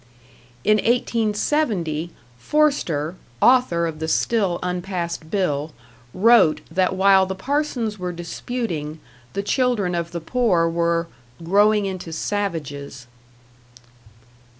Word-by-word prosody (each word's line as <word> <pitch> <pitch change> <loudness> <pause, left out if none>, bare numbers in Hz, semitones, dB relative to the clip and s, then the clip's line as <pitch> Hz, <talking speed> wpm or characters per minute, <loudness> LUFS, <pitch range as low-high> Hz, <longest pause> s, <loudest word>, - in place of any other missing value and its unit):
In 215 0 +4
1870, 215 - 0 0.3
Forster, 175 - +1 0.3
author 245 - +4
of 160 -2 -4
the 160 - -3
still 195 0 +1
unpassed 180 -3 -3
bill, 155 -6 -1 0.4
wrote 210 - +4
that 185 +2 +1
while 190 0 +5
the 190 - -4
parsons 245 -3 -2
were 180 0 -3
disputing, 170 -2 -4 0.3
the 200 - -2
children 225 -6 +1
of 170 -1 -2
the 170 - -4
poor 180 -2 +1
were 170 0 0 0.4
"growing 205 +4 +3
into 185 -3 -5
savages." 155 -8 -4
185 Hz, 105 wpm, -22 LUFS, 165-215 Hz, 0.4 s, while